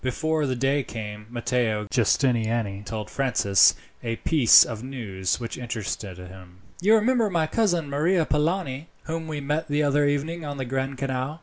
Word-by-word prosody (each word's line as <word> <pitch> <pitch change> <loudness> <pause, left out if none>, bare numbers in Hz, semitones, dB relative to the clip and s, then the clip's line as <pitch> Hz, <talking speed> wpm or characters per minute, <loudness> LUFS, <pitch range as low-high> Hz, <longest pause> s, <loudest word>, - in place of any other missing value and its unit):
Before 155 +4 0
the 130 - -1
day 135 +3 +1
came 105 -4 -7
Matteo 120 -3 -1
Giustiniani 115 -4 +1
told 110 -1 -5
Francis 125 -8 +3 0.3
a 115 -1 -2
piece 135 -2 +6
of 115 -1 -6
news 105 -9 -3
which 115 0 -6
interested 110 -5 -5
him. 90 0 -12 0.2
"You 210 +5 +5
remember 225 0 +2
my 170 -4 +1
cousin 175 -3 0
Maria 160 +5 +1
Polani, 150 -2 -1 0.2
whom 160 0 -4
we 150 -2 -4
met 150 +3 -2
the 145 +1 +1
other 145 0 +2
evening 155 +4 -2
on 145 -1 -5
the 130 - -3
Grand 135 +1 -3
Canal?" 135 +3 -3
135 Hz, 165 wpm, -25 LUFS, 115-155 Hz, 0.3 s, piece